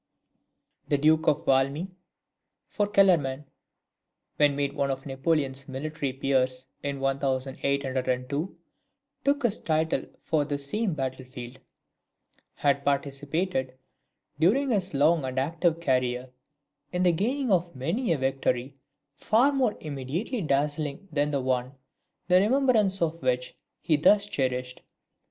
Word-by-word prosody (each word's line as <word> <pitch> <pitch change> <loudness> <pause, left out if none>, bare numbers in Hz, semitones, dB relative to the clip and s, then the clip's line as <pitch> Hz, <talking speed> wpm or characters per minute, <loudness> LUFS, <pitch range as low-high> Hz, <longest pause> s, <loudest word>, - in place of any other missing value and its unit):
The 145 - +2
Duke 155 +2 +3
of 145 - +2
Valmy 140 +7 +1 0.8
(for 205 -1 -1
Kellerman, 165 -9 +3 0.9
when 145 -1 +4
made 140 0 -1
one 140 -2 0
of 135 0 -3
Napoleon's 135 -1 -1
military 140 +1 -3
peers 130 -1 0
in 140 -1 -3
1802, 135 +1 -1 0.7
took 280 0 +1
his 225 -3 +1
title 160 0 0 0.2
from 150 -3 0
this 140 -1 -3
same 210 0 -1
battlefield) 130 -2 -6 1.0
had 140 -1 +1
participated, 140 0 -1 0.6
during 250 - +3
his 190 -7 0
long 155 +2 +4
and 130 0 -4
active 165 +4 +1
career, 125 -4 0 0.6
in 180 0 0
the 180 - +5
gaining 240 - 0
of 175 -4 +1
many 170 - -1
a 165 - +2
victory 135 -1 -1 0.4
far 235 - +3
more 260 -6 +1
immediately 155 - -3
dazzling 145 +2 -1
than 145 -1 +1
the 145 - 0
the 135 - -3
one, 130 +1 -1 0.5
the 180 0 +6
remembrance 215 -4 +3
of 165 0 -2
which 125 -1 0 0.3
he 155 -3 +2
thus 200 +7 +5
cherished. 125 -8 -2
145 Hz, 125 wpm, -27 LUFS, 135-175 Hz, 1.0 s, the